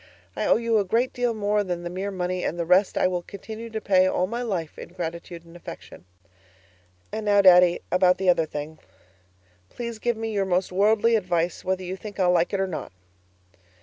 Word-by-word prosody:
I - - -1
owe - - +5
you 230 -1 +1
a - - +2
great 230 +7 0
deal 245 -2 -1
more 210 0 0
than 175 -2 -4
the 175 - -4
mere 190 +3 -3
money, 180 -1 -3
and 170 - -2
the 170 - -2
rest 185 +3 +3
I - - +2
will 180 -1 -2
continue 220 +5 -9
to 220 -1 -4
pay 185 -3 +3
all 185 - +1
my 235 +5 -4
life 185 -10 -4
in - - -9
gratitude 170 -1 -6
and 165 0 -16
affection. 175 - -11 1.1
And 220 - -4
now, 205 -1 +4
Daddy, 180 -1 +6
about 180 0 +4
the 190 - -3
other 165 -3 +3
thing; 150 +1 -7 0.9
please 235 -2 -6
give 240 0 -1
me 225 0 -3
your 200 -2 0
most 185 0 0
worldly 215 +4 +3
advice, 175 -4 -1
whether 185 0 -2
you 185 +1 -4
think 205 +1 -10
I'll 180 -1 +4
like 175 -1 +2
it 200 - -1
or 195 - +1
not. 185 -4 -6
185 Hz, 210 wpm, -24 LUFS, 175-215 Hz, 1.1 s, Daddy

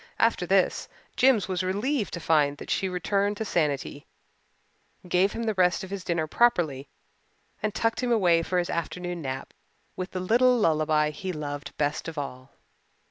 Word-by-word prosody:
After - - +2
this - - +2 0.3
Jims 250 -5 +4
was 185 -1 -1
relieved 210 +6 -1
to - - -5
find 150 -3 +2
that - - -7
she 190 - 0
returned 200 +3 0
to 220 - -3
sanity, 145 -5 -1 1.0
gave 180 +3 +2
him 230 - -3
the 220 -1 0
rest 180 -2 +2
of 190 - -8
his 200 -2 -4
dinner 170 -3 0
properly, 155 - +1 0.7
and 215 - 0
tucked 225 +3 0
him 250 -1 0
away 180 -7 +4
for 180 +2 -2
his 175 -1 0
afternoon 175 +1 -3
nap 130 -2 -5 0.4
with 185 0 -4
the 185 - -4
little 245 +7 +4
lullaby 155 -5 +2
he 185 +5 -5
loved 145 -3 -6
best 150 +2 -1
of 165 -1 -7
all. 130 -2 -6
180 Hz, 170 wpm, -26 LUFS, 155-205 Hz, 1.0 s, Jims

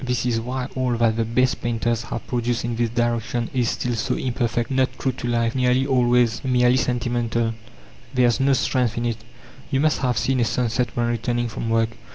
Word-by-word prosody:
This 125 -1 -1
is 115 -2 +1
why 125 +2 -3
all 125 -2 0
that 115 -1 +2
the 115 - +2
best 125 +3 +1
painters 115 -1 -1
have - - -5
produced 120 -1 -1
in 120 -1 -2
this 115 0 0
direction 120 0 -1
is 125 -3 +1
still 125 - -2
so 115 - -1
imperfect, 120 -1 -1
not 130 0 +2
true 130 - 0
to 120 -1 -6
life, 115 -1 +1
nearly 130 0 +2
always 125 -3 +2
merely 125 -1 +3
sentimental. 120 -2 0 0.6
There 125 -2 +3
is 120 +2 +2
no 135 +1 +3
strength 125 -3 0
in 120 - -1
it. 115 -2 -1 0.5
You 135 - +1
must 155 +1 +2
have 125 -3 0
seen 135 -1 +1
a - - +3
sunset 120 +1 0
when 120 - +2
returning 120 0 -1
from 115 +1 -4
work. 115 0 +2
120 Hz, 205 wpm, -23 LUFS, 115-125 Hz, 0.6 s, merely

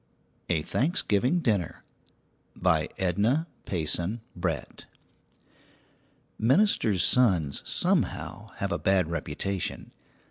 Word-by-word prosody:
A 80 -3 +1
THANKSGIVING 135 - +1
DINNER 100 - -1 0.7
BY - - +1
EDNA 105 - +1 0.2
PAYSON 90 +5 -1
BRETT. 85 -4 -4 1.5
Ministers' 115 - +3
sons, 95 - +3
somehow, 100 +5 -1
have 100 -1 -3
a - - -1
bad 95 -4 +2
reputation. 85 +4 -3
95 Hz, 80 wpm, -27 LUFS, 85-115 Hz, 1.5 s, Ministers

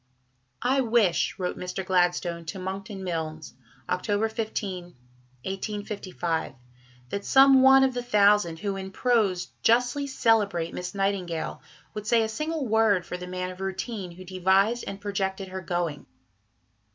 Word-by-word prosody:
"I 265 +2 +3
wish," 220 -8 +2
wrote 180 -2 -3
Mr. 180 +1 -4
Gladstone 175 -2 +1
to 170 - -5
Monckton 195 +2 -5
Milnes 160 -4 -4 0.3
(Oct. 205 +4 0
15, 210 -5 -3 0.6
1855), 190 - -3 0.5
"that 200 +7 -3
some 270 +2 +6
one 265 0 +7
of 265 -1 +2
the 245 - -2
thousand 205 -7 +3
who 195 +3 -3
in 190 0 -5
prose 200 -5 +1
justly 245 +5 +2
celebrate 205 -10 +1
Miss 180 +2 -5
Nightingale 195 -4 -2 0.3
would 210 0 -6
say 230 0 +4
a 220 - -2
single 305 +5 -2
word 215 -5 +3
for - - -5
the 180 0 -8
man 180 0 -4
of 185 +1 -11
'routine' 195 -1 -4
who 185 +2 -11
devised 190 +5 +2
and 195 - -5
projected 195 -1 -3
her 190 0 -5
going." 175 -4 -3
195 Hz, 140 wpm, -26 LUFS, 180-225 Hz, 0.6 s, one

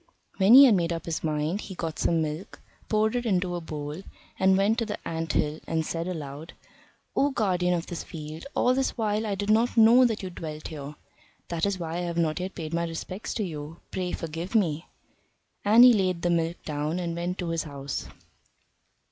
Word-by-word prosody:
When 195 +5 +7
he 280 +1 +11
had 245 - +6
made 170 -3 +1
up 165 -1 -4
his 165 -2 -3
mind, 155 +5 -1
he 190 - -8
got 165 -3 -4
some 165 -1 +2
milk, 155 +5 -6 0.3
poured 215 +1 +2
it 245 - 0
into 180 -3 +1
a 175 - -3
bowl, 150 +1 -6 0.4
and 190 0 +4
went 210 +4 +2
to 230 - 0
the 210 - -3
ant 165 -1 -3
hill, 150 +1 0
and 160 -1 0
said 165 +2 -3
aloud: 155 -2 -6 0.6
"O 285 - +3
Guardian 180 -8 +1
of 170 0 -3
this 175 -3 -5
Field! 155 - -8
all 250 - +3
this 265 0 -1
while 215 -1 0
I 200 - -1
did 205 +2 -1
not 230 +3 +2
know 230 +3 +7
that 225 -4 -1
you 185 - -5
dwelt 155 -3 -7
here. 150 -2 -7 0.5
That 170 +2 0
is 200 -1 -1
why 165 -1 -4
I 175 0 -2
have 170 0 -4
not 160 0 +1
yet 185 +1 -5
paid 160 -2 -6
my 170 0 0
respects 185 +5 -5
to 215 - -1
you; 155 -2 -6
pray 180 -1 -2
forgive 165 +5 -5
me." 165 -6 +1 0.8
And 220 +4 +7
he 250 -1 +9
laid 185 -5 0
the 175 - +2
milk 170 0 -1
down 150 +2 -2
and 170 -2 -3
went 175 +2 -3
to 175 -2 -3
his 165 -1 -1
house. 140 -2 -5
175 Hz, 210 wpm, -27 LUFS, 160-200 Hz, 0.8 s, he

